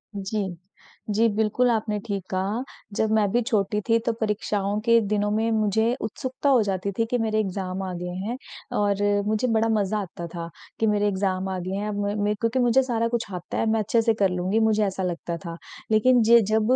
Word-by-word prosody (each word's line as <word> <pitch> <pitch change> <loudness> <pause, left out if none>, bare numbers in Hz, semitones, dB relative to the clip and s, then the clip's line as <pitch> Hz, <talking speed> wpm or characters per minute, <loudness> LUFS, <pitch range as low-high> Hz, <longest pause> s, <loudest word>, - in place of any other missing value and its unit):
जी। 195 -2 -3 0.5
जी 220 +3 +3
बिल्कुल, 220 +3 +2
आपने 215 -2 0
ठीक 200 -4 -3
कहा। 195 +6 -1 0.3
जब 220 0 +1
मैं 215 -2 +3
भी 240 - +2
छोटी 210 -3 0
थी 230 - +5
तो 235 - +2
परीक्षाओं 210 -1 -1
के 230 0 +6
दिनों 205 0 0
में 220 +2 +1
मुझे 220 +2 +2
उत्सुकता 260 +5 -2
हो 255 -4 +5
जाती 195 0 -2
थी 225 - +3
कि 245 - +2
मेरे 220 -1 0
एग्ज़ाम 190 -2 -3
आ 185 -1 -4
गए 180 0 -4
हैं 240 +3 -3 0.4
और 205 -1 +1 0.3
मुझे 215 +4 +1
बड़ा 225 -1 +2
मज़ा 210 -1 +1
आता 170 -3 -6
था, 170 0 -6 0.3
कि 220 - +2
मेरे 205 0 +2
एग्ज़ाम 190 -1 -1
आ 190 - -2
गए 185 +2 -4
हैं, 205 +1 -2
अब 205 - -3
मेैं 205 +1 -1
मैं 210 0 0
क्योंकि 230 +4 0
मुझे 245 +2 +4
सारा 230 -2 0
कुछ 235 -1 -1
आता 180 -1 -5
है, - - +1
मैं 220 - +2
अच्छे 225 +2 +2
से 225 0 +2
कर 200 -3 +2
लूँगी, 180 +4 0
मुझे 215 -1 +3
ऐसा 190 -1 -2
लगता 170 -1 -3
था। 170 0 -6 0.3
लेकिन 245 +3 +5
ज 235 +1 +7
जब 220 0 +3
210 Hz, 215 wpm, -25 LUFS, 195-225 Hz, 0.5 s, ज